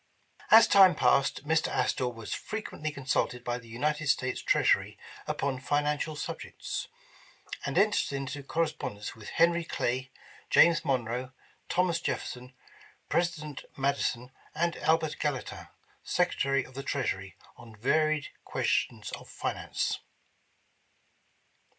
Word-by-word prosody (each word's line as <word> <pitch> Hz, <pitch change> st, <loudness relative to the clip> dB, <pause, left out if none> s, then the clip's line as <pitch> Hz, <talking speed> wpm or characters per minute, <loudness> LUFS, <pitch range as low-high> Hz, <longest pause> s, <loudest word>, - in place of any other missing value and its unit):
As 225 Hz, +1 st, +9 dB
time 190 Hz, -4 st, +7 dB
passed, 140 Hz, -1 st, +2 dB
Mr. 160 Hz, 0 st, +2 dB
Astor 125 Hz, -, 0 dB
was 115 Hz, -3 st, -6 dB
frequently 210 Hz, -8 st, -4 dB
consulted 130 Hz, -3 st, -1 dB
by 120 Hz, 0 st, -2 dB
the 115 Hz, -, -15 dB
United 150 Hz, +6 st, -1 dB
States 130 Hz, -2 st, +1 dB
Treasury -, -, +2 dB, 0.3 s
upon 135 Hz, -2 st, -1 dB
financial 150 Hz, +3 st, 0 dB
subjects; -, -, -5 dB, 0.8 s
and -, -, -2 dB
entered 205 Hz, -4 st, +3 dB
into 140 Hz, +1 st, -4 dB
correspondence 140 Hz, -9 st, -3 dB
with 110 Hz, -2 st, -10 dB
Hen'ry 170 Hz, +1 st, +3 dB
Clay, 130 Hz, -4 st, -2 dB, 0.4 s
James 170 Hz, -1 st, +6 dB
Monroe, 125 Hz, -2 st, -1 dB, 0.4 s
Thomas 175 Hz, -2 st, +1 dB
Jefferson, 125 Hz, -5 st, -4 dB, 0.6 s
President 160 Hz, -5 st, -1 dB
Madison, 135 Hz, -2 st, 0 dB, 0.2 s
and 170 Hz, +1 st, +1 dB
Albert 160 Hz, -1 st, +1 dB
Gallatin, 145 Hz, -4 st, -3 dB, 0.4 s
Secretary 140 Hz, -6 st, +1 dB
of 130 Hz, -, -15 dB
the 135 Hz, -, -5 dB
Treasury, 100 Hz, -10 st, -3 dB, 0.2 s
on 115 Hz, -2 st, -13 dB
varied 155 Hz, +6 st, +1 dB
questions -, -, -1 dB
of -, -, -8 dB
finance. -, -, -2 dB
140 Hz, 115 wpm, -29 LUFS, 125-160 Hz, 0.8 s, As